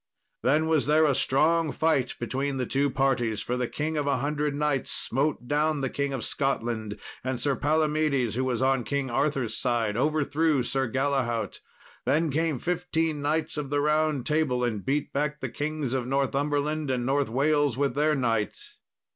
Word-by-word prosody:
Then 150 +5 +3
was 160 -3 +1
there 155 +1 +5
a 145 - +3
strong 155 +4 +2
fight 150 -6 +1
between 135 +3 -2
the 125 - -1
two 140 +3 +1
parties, 130 -5 +1
for 125 - -2
the 125 -1 -1
King 155 +4 -3
of 145 -1 -1
a 140 - +2
Hundred 145 +2 -1
Knights 145 -2 0
smote 135 -1 -1
down 150 +1 +1
the 135 - -1
King 140 0 -1
of 130 -5 -3
Scotland; 115 -6 -2 0.3
and 130 -1 -2
Sir 140 +2 +1
Palomedes, 150 -5 +1
who 130 +3 -1
was 130 -1 0
on 135 -2 +2
King 140 -1 -2
Arthur's 135 -2 0
side, 115 -4 0
overthrew 150 +1 +1
Sir 135 0 -1
Galahaut. 130 -3 -1 0.4
Then 160 0 +1
came 160 0 0
fifteen 165 -1 -1
Knights 155 +2 -1
of 145 -2 -3
the 145 0 +1
Round 150 -2 +1
Table 150 -5 +1
and 110 -5 -1
beat 140 +2 -1
back 150 +1 -1
the - - -3
Kings 150 -3 -3
of 130 -2 -1
Northumberland 145 +2 0
and 125 -2 0
North 140 0 +1
Wales 145 +1 +2
with 140 -2 +1
their 150 +2 +2
knights. 115 -5 -2
140 Hz, 175 wpm, -27 LUFS, 130-150 Hz, 0.4 s, there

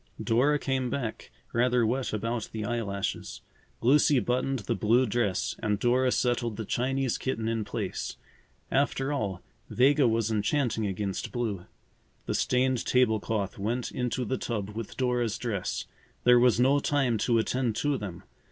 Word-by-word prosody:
Dora 135 +6 +3
came 130 -3 -1
back, 120 -4 -4 0.2
rather 120 0 +3
wet 125 +4 -1
about 115 +1 -2
the 110 -1 -4
eyelashes. 100 -4 -3 0.4
Lucy 140 +3 +5
buttoned 125 +4 0
the - - 0
blue 115 +6 +3
dress 105 -4 0
and 105 -2 0
Dora 125 +3 +2
settled 120 -4 0
the 110 - -4
Chinese 130 +3 0
kitten 115 -4 -2
in 115 -1 0
place. - - -4 0.5
After 135 +1 +1
all, 100 -10 -3 0.3
Vega 135 +1 +4
was 115 -1 +1
enchanting 110 +1 0
against 95 0 -3
blue. 110 -7 -3 0.6
The - - -2
stained 125 -1 +1
table 125 -4 +3
cloth 100 -2 -3
went 115 +5 -2
into 125 0 -2
the 130 +4 -2
tub 105 -4 -3
with 115 +1 -7
Dora's 125 -4 0
dress. 105 -7 -3 0.4
There 125 0 +7
was 120 -1 +4
no 135 +3 +4
time 135 -6 +1
to 120 +1 +2
attend 120 0 0
to 145 +4 +1
them. 100 -8 -6
120 Hz, 150 wpm, -28 LUFS, 110-130 Hz, 0.6 s, There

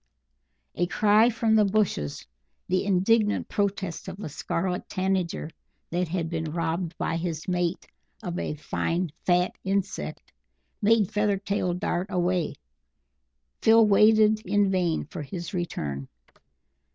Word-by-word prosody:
A 175 - 0
cry 215 +4 +4
from 225 -1 +1
the 215 -1 +6
bushes 195 - 0 0.4
the 185 +2 +1
indignant 205 +3 +2
protest 195 -4 -2
of 190 +1 -7
a 205 - -5
Scarlet 180 +4 -3
Tanager, 185 -4 -1 0.4
that 175 +1 0
had 165 0 -2
been 160 -1 -3
robbed 165 0 -2
by 165 - -1
his 165 -2 -4
mate 180 -1 -1 0.4
of 175 -3 -3
a - - -3
fine 165 +3 -2 0.2
fat 180 0 +3
insect 195 0 -3 0.5
made 215 -1 +3
Feathertail 200 -3 0
dart 180 -1 -1
away. 180 -2 0 1.1
Phil 225 0 +6
waited 215 +1 +5
in 200 0 +2
vain 175 -4 0
for 160 +2 -7
his 170 +6 -6
return. 70 - -3
185 Hz, 125 wpm, -26 LUFS, 170-205 Hz, 1.1 s, the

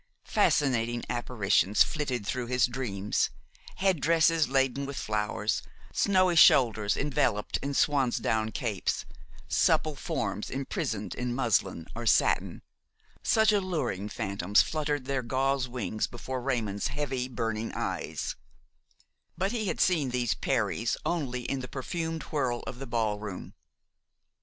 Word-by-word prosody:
Fascinating 120 -4 +2
apparitions 110 -4 +3
flitted 130 -8 -3
through 125 +2 -2
his 125 0 +3
dreams; 110 -6 -1 0.5
head 190 -5 +1
dresses 165 -1 +4
laden 135 +1 +1
with 140 - -6
flowers, 105 0 -1 0.3
snowy 185 -3 +3
shoulders 110 -9 +5
enveloped 130 -7 0
in 140 +1 -4
swansdown 120 -6 +1
capes, 110 -5 -2 0.4
supple 155 -2 +2
forms 105 -5 -3
imprisoned 115 -6 -3
in 125 -1 -3
muslin 100 -9 +1
or 115 0 -4
satin: - - +2 0.6
such 220 -1 +4
alluring 170 - -1
phantoms 100 0 +2
fluttered 150 -3 -2
their 135 -1 -1
gauze 130 +2 0
wings 110 -4 -2
before 130 +2 -5
Raymon's 115 -6 -1
heavy, 135 -3 -2
burning 115 -2 -3
eyes; - - -3 1.0
but 190 +4 0
he 220 -4 -2
had - - -2
seen 160 -8 +3
these 125 -2 0
peris 115 +1 0
only 135 -8 -1
in 135 +2 -2
the 125 - -5
perfumed 160 +5 -4
whirl 130 -6 -1
of 125 -2 -7
the 135 - -6
ballroom. 105 -4 -3
125 Hz, 125 wpm, -29 LUFS, 110-145 Hz, 1.0 s, shoulders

